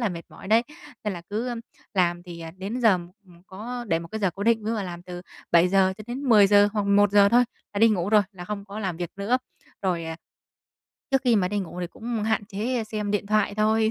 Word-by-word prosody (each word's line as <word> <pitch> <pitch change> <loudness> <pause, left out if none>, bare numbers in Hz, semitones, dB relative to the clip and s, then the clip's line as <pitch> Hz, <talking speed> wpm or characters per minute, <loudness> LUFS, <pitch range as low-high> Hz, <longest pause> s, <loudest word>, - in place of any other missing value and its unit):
là 230 - +1
mệt 170 -3 -6
mỏi - - -12
đấy. 225 +2 +5 0.4
Nên 210 - -1
là 175 - -7
cứ 235 +4 -2 0.4
làm 175 -2 +1
thì, 175 -2 -9
ờ, 165 0 -7
đến 205 +7 -4
giờ 225 -2 +6 0.4
ừm, 175 -1 -19
có 240 +6 -6
để 165 -2 +2
một 170 0 -9
cái 220 - -5
giờ 195 -3 +1
cố 195 - -5
định, 225 0 +2
ví 220 - -2
dụ - - 0
là 210 - -2
làm 175 -2 -7
từ 180 0 -8 0.3
7:00 185 +2 +4
cho 215 - -8
đến 250 +3 -5
10:00 205 -4 +6
hoặc 210 -2 0
11: 200 0 +5
thôi, 245 +3 +5 0.3
là - - -1
đi 225 +2 +6
ngủ 190 -4 0
rồi, 210 -1 +5
là 180 -2 -9
không 200 +1 -5
có 200 +1 -8
làm 185 -5 -2
việc 175 0 -4
nữa. 200 +5 +1 0.5
Rồi, 175 -3 0
à, 160 0 -5 0.9
trước 270 -1 +3
khi 240 -3 +4
mà 185 -3 +2
đi 205 +2 -1
ngủ 180 -2 -5
thì 175 - -2
cũng 225 +4 -4
hạn 220 -1 0
chế 220 +4 -2
xem 215 -1 -3
điện 205 -1 -1
thoại 210 -1 +1
thôi, 220 +1 +2
205 Hz, 245 wpm, -25 LUFS, 180-220 Hz, 0.9 s, giờ